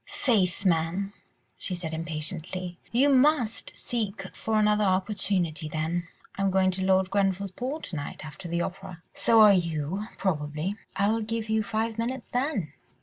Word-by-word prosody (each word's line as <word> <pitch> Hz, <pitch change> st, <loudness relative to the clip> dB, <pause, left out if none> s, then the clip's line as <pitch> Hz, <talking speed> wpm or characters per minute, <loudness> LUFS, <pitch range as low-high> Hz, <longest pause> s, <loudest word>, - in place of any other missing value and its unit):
"Faith, 220 Hz, -, +1 dB
man!" 180 Hz, +3 st, +1 dB, 0.5 s
she 185 Hz, -, -2 dB
said 165 Hz, -2 st, -5 dB
impatiently, 165 Hz, +2 st, -4 dB
"you 255 Hz, +5 st, +4 dB
must 270 Hz, -4 st, +3 dB
seek 220 Hz, -5 st, -3 dB
for 220 Hz, -1 st, 0 dB
another 210 Hz, 0 st, +4 dB
opportunity 185 Hz, -5 st, 0 dB
then. 160 Hz, +3 st, -2 dB, 0.3 s
I -, -, -4 dB
am 195 Hz, -, +3 dB
going 190 Hz, 0 st, +3 dB
to 190 Hz, +1 st, 0 dB
Lord 190 Hz, 0 st, +3 dB
Grenville's 195 Hz, -1 st, +1 dB
ball 260 Hz, +10 st, -4 dB
to 175 Hz, -, -6 dB
night 145 Hz, 0 st, -5 dB
after 160 Hz, +5 st, -8 dB
the 170 Hz, +1 st, 0 dB
opera. 185 Hz, -2 st, -7 dB
So 225 Hz, -1 st, +5 dB
are 210 Hz, -1 st, +9 dB
you, 170 Hz, +3 st, -1 dB
probably. 155 Hz, +1 st, -1 dB, 0.2 s
I'll 215 Hz, +3 st, +2 dB
give 220 Hz, 0 st, -3 dB
you 220 Hz, 0 st, +2 dB
five 220 Hz, +2 st, -2 dB
minutes 250 Hz, +2 st, -3 dB
then. 245 Hz, -, -1 dB
195 Hz, 155 wpm, -27 LUFS, 170-220 Hz, 0.5 s, are